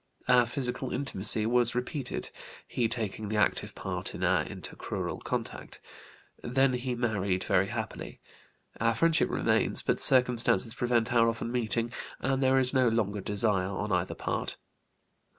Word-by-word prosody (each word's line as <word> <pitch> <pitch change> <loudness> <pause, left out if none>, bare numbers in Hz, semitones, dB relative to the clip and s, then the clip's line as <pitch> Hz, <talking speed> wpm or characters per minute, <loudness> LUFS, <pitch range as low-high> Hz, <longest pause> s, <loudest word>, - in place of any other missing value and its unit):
Our 125 -1 +4
physical 130 -1 -3
intimacy 110 -5 0
was 120 +1 +1
repeated, 125 +2 -4 0.4
he 120 - -1
taking 110 -2 -4
the 110 - -3
active 105 - -1
part - - -5
in - - -8
intercrural - - -3
contact. - - -6 0.6
Then 135 +2 +1
he 125 0 -3
married 100 -6 -2
very 95 -1 +1
happily. - - -7 0.6
Our 115 0 +1
friendship 165 +5 +2
remains, - - +1
but - - -1
circumstances 125 -4 +7
prevent 120 -1 -1
our 115 -1 +4
often 115 +1 -5
meeting, 115 -1 -1 0.3
and 135 0 -1
there 130 0 +3
is 130 0 +3
no 130 -2 +3
longer 105 -3 -1
desire 100 -1 +1
on 100 +2 -4
either 90 0 -1
part. - - -4
115 Hz, 140 wpm, -28 LUFS, 105-125 Hz, 0.6 s, circumstances